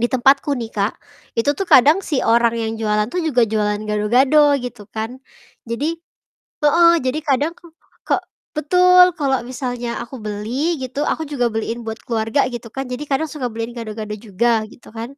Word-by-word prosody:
Di 240 - +2
tempatku 275 +3 +3
nih 230 -2 -6
Kak, 200 +1 -1 0.4
itu 230 +5 +2
tuh 380 +5 -4
kadang 295 +5 +6
si 305 -8 -2
orang 235 0 +3
yang 225 -1 -2
jualan 210 -1 +1
tuh 360 - -1
juga 260 -8 +2
jualan 210 -1 -1
gado-gado 260 +8 +3
gitu 245 -5 -7
kan. 225 +4 -5 0.5
Jadi 300 +8 -2 0.6
heeh, 335 +3 +6
jadi 260 +4 -1
kadang 295 +4 0
kok 340 -2 -18 0.3
kok - - +1 0.3
betul, 360 +3 +5
kalau 270 -4 +1
misalnya 245 -1 -4
aku 240 +1 -8
beli 230 +11 -2
gitu, 265 +2 -4
aku 315 +1 -1
juga 255 -5 -1
beliin 225 +1 -3
buat 220 0 -5
keluarga 225 +3 +1
gitu 235 -1 -7
kan, 270 +3 -5
jadi 250 +2 -6
kadang 280 +3 +1
suka 255 -5 -3
beliin 230 +1 -5
gado-gado 215 -2 -6
juga 220 +2 0
gitu 225 - -17
kan. 230 +5 -7
245 Hz, 175 wpm, -20 LUFS, 225-290 Hz, 0.6 s, kadang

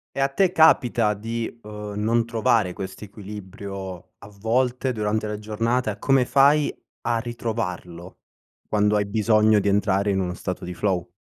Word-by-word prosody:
E, - - -3
a 135 - +4
te 180 +7 +2
capita 120 - +4
di, 115 +2 -5
uhm, 105 -1 -7
non 115 +2 +2
trovare 115 -5 +1
questo 95 +2 -7
equilibrio 100 -2 -8
a 100 - -12
volte 125 +5 0
durante 110 -1 -1
la 105 0 -4
giornata, 115 +3 -1
e - - -14
come 135 +2 +3
fai 145 +3 +4 0.3
a 115 0 0
ritrovarlo, 110 -7 -5 0.5
quando 105 0 +2
hai 100 -1 +1
bisogno 110 0 +3
di 100 - 0
entrare 100 0 +2
in 95 - 0
uno 90 -1 -2
stato 90 0 -5
di 90 0 -6
flow? 90 -4 -1
105 Hz, 160 wpm, -24 LUFS, 100-115 Hz, 0.5 s, a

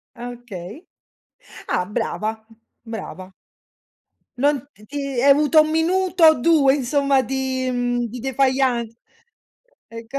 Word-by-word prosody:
Ah, 245 0 -7
okay. 240 - -10 0.8
Ah, 180 - 0
brava. 220 +2 -4 0.4
Brava. 190 -4 -8 1.1
Non 290 +3 +3 0.2
ti 210 - -19
ti 290 +6 -6 0.2
hai 280 +3 +5
avuto 300 +2 +5
un 310 - -3
minuto 360 +3 0
o 315 - +8
2 285 0 +4
insomma 275 0 +1
di, 260 0 -2
mhmm, 245 0 -1
di 240 +2 -8
défaillance 260 -3 0 0.9
ecco. 230 +4 -7
260 Hz, 120 wpm, -21 LUFS, 230-285 Hz, 1.1 s, o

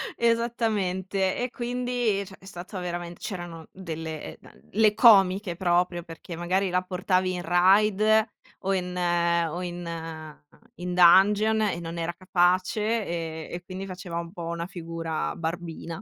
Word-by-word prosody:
esattamente. 210 -5 0
E 250 0 -1
quindi, 245 -4 -1
cioè 190 - -12
è 190 - -18
stato 185 0 -7
veramen 175 -1 -4
c'erano 175 -5 -7
delle, 160 -4 -6
uhm, - - -17
le 215 0 +4
comiche 195 -5 +5
proprio 175 -1 +1
perché 165 +1 -9
magari 185 +3 0
la 180 +1 +1
portavi 185 0 0
in 180 - -3
Raid 190 +4 +4 0.6
o 195 0 -1
in 180 -1 -2
o 170 -1 +1
in 165 -3 -6 0.4
in 180 0 -4
Dungeon 205 +5 +6
e 200 -5 0
non 165 0 -6
era 170 +1 -2
capace 185 +4 +1
e 165 -2 -4
e 175 - -5
quindi 190 +1 -6
faceva 180 -2 -6
un 170 0 -6
po' 170 -4 -7
una 170 +1 -3
figura 165 -3 -4
barbina. 165 0 -5
180 Hz, 140 wpm, -26 LUFS, 170-195 Hz, 0.6 s, Dungeon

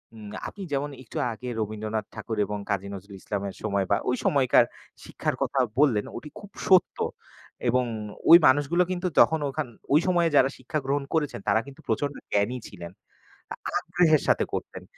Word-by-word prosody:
উম 105 -2 -9 0.2
আপনি 200 - -8
যেমন 140 +1 -1
একটু 115 - -9
আগে 125 +3 -6
রবীন্দ্রনাথ 110 0 -3
ঠাকুর 110 - -5
এবং 105 0 -4
কাজী 100 -1 -1
নজরুল 100 +1 -9
ইসলামের 100 -1 -4
সময় 100 -2 0
বা - - +6
ওই 125 - +2
সময়কার 135 -3 +4 0.4
শিক্ষার - - -3
কথা 135 - 0 0.2
বললেন 125 -8 +3
ওটি 150 +6 -8
খুব 205 -1 -12 0.2
সত্য। 185 -1 +4 0.7
এবং 125 +1 +2 0.4
ওই 165 - +12
মানুষগুলো 145 +6 +3
কিন্তু 180 0 -1
যখন 160 - +5
ওখান 145 +1 -3 0.3
ওই 150 - +7
সময়ে 175 -2 +3
যারা 135 - +6
শিক্ষা 130 +4 -3
গ্রহণ 140 +1 0
করেছেন 150 -3 0
তারা 105 +2 +4
কিন্তু 140 -1 -13
প্রচণ্ড 145 -1 -1 0.2
জ্ঞানী 105 +5 +1
ছিলেন, 85 -4 -9 0.9
আগ্রহের 155 -4 +3
সাথে - - +3
করতেন। - - -5
130 Hz, 165 wpm, -26 LUFS, 105-150 Hz, 0.9 s, ওই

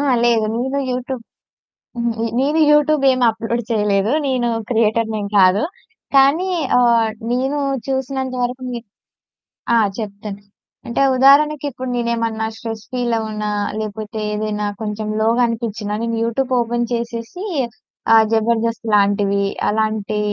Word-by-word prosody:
ఆ! - - 0 0.2
లేదు. 230 -2 +3
నేను 265 +3 -1
యూట్యూబ్ 250 0 -4 0.8
హుహు. 235 0 0
ఈ - - +1
నేను 295 +4 +1
యూట్యూబ్ 295 -1 +3
ఏం 255 0 -1
అప్‌లోడ్ 225 +2 -2
చేయలేదు. 210 -1 +1 0.2
నేను 255 -2 0 0.2
క్రియేటర్ 225 -1 +2
నేం 210 -2 -2
కాదు. 185 +2 +5 0.5
కానీ, 280 +8 +4 0.3
ఆహ్, 235 -2 +3 0.2
నేను 265 +4 0 0.3
చూసినంత 265 -1 -2
వరకునే 250 0 -3 0.9
ఆ! - - +5 0.2
చెప్తాను. 205 -2 -6 0.5
అంటే, 235 +3 -1 0.2
ఉదాహరణకి 290 +3 +5
ఇప్పుడు 255 0 -6
నేనేమన్నా 230 -2 -1
స్ట్రెస్ 225 -1 -6
ఫీలవునా, 220 -4 -1 0.3
లేపోతే 215 0 -5
ఏదైనా 210 0 -2 0.2
కొంచెం 210 0 -3
లోగా 230 +3 +2
అనిపిచ్చినా 220 -3 -3
నేను 230 0 -1
యూట్యూబ్ 250 +3 -1
ఓపెన్ 240 0 -1
చేసేసి 235 - -4 0.7
ఆహ్, 220 -1 +7
'జబర్దస్త్' 225 0 0
లాంటివి, 200 0 +2 0.2
అలాంటి 215 -1 -1
230 Hz, 120 wpm, -19 LUFS, 215-255 Hz, 0.9 s, ఆహ్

